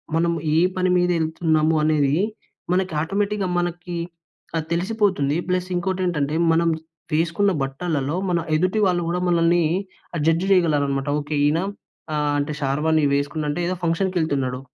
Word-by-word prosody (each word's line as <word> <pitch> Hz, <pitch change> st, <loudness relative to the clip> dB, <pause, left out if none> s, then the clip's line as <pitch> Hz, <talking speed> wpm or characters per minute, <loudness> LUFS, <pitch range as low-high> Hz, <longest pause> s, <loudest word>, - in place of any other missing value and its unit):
మనం 170 Hz, +1 st, +2 dB, 0.2 s
ఏ -, -, +4 dB, 0.2 s
పని 185 Hz, 0 st, +1 dB
మీద 180 Hz, 0 st, +2 dB
వెళ్తున్నాము 160 Hz, 0 st, +1 dB
అనేది 145 Hz, -2 st, +2 dB, 0.6 s
మనకి 185 Hz, -2 st, +1 dB
ఆటోమేటిక్‍గా 200 Hz, +3 st, -1 dB
మనకి 175 Hz, 0 st, -3 dB, 0.6 s
ఆ! -, -, +2 dB
తెలిసిపోతుంది. 180 Hz, -5 st, +1 dB
ప్లస్ 180 Hz, 0 st, -1 dB
ఇంకోటేంటంటే 175 Hz, -5 st, -1 dB, 0.2 s
మనం 165 Hz, +1 st, +3 dB, 0.4 s
వేసుకున్న 170 Hz, +6 st, +2 dB
బట్టలలో 140 Hz, +1 st, -2 dB
మన 175 Hz, -, +2 dB, 0.2 s
ఎదుటి 185 Hz, +6 st, +1 dB
వాళ్ళు 175 Hz, -1 st, +1 dB
కూడా 175 Hz, +1 st, 0 dB
మనల్ని 170 Hz, 0 st, +3 dB, 0.5 s
ఆహ్, 165 Hz, -, -1 dB
జడ్జ్ 165 Hz, +3 st, +2 dB
చేయగలరన్నమాట. 145 Hz, -6 st, +2 dB
ఓకే. 150 Hz, +1 st, -4 dB
ఈయన 155 Hz, +3 st, +2 dB, 0.5 s
ఆహ్, 150 Hz, -1 st, +1 dB
అంటే 145 Hz, +1 st, -2 dB
షార్వాని 150 Hz, +3 st, +1 dB
వేసుకున్నాడు 150 Hz, +1 st, -2 dB
అంటే 175 Hz, +4 st, -3 dB
ఏదో 185 Hz, -, -1 dB
ఫంక్షన్‍కె 180 Hz, +2 st, +1 dB
ళ్తున్నాడు. 130 Hz, -4 st, -1 dB
165 Hz, 140 wpm, -22 LUFS, 150-180 Hz, 0.6 s, ఏ